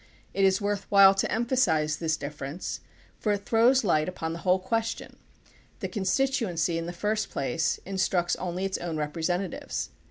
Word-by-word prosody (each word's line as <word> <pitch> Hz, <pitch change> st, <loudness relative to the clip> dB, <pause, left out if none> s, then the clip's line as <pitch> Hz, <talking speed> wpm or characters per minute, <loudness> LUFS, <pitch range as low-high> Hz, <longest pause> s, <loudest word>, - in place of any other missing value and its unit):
It 195 Hz, -, +1 dB
is 190 Hz, 0 st, +3 dB
worth 205 Hz, -1 st, -2 dB
while 195 Hz, -1 st, +8 dB
to 195 Hz, -, -1 dB
emphasize 185 Hz, -, +1 dB
THE 165 Hz, -, -4 dB
PUBLIC 160 Hz, -, +2 dB, 0.2 s
OPINION -, -, -24 dB
BILL -, -, -4 dB
11 150 Hz, +6 st, -7 dB
this -, -, -4 dB
difference, -, -, -7 dB, 0.3 s
for 210 Hz, -, 0 dB
it 200 Hz, 0 st, -4 dB
throws 240 Hz, +4 st, +4 dB
Hght 155 Hz, -6 st, +2 dB
upon 165 Hz, -3 st, -4 dB
the 170 Hz, -, -6 dB
whole 180 Hz, +1 st, +3 dB
ques 225 Hz, +4 st, -1 dB
tion. -, -, -11 dB, 0.6 s
The -, -, -3 dB
constituency, 190 Hz, -, 0 dB
in 165 Hz, -, -5 dB
the -, -, -3 dB
first 215 Hz, +4 st, -1 dB
place, 160 Hz, +4 st, -1 dB
instructs 185 Hz, -2 st, 0 dB
only 185 Hz, +1 st, -3 dB
its 195 Hz, -, -2 dB
own 170 Hz, -2 st, -3 dB
representatives. 165 Hz, +4 st, -2 dB
185 Hz, 195 wpm, -27 LUFS, 165-205 Hz, 0.6 s, while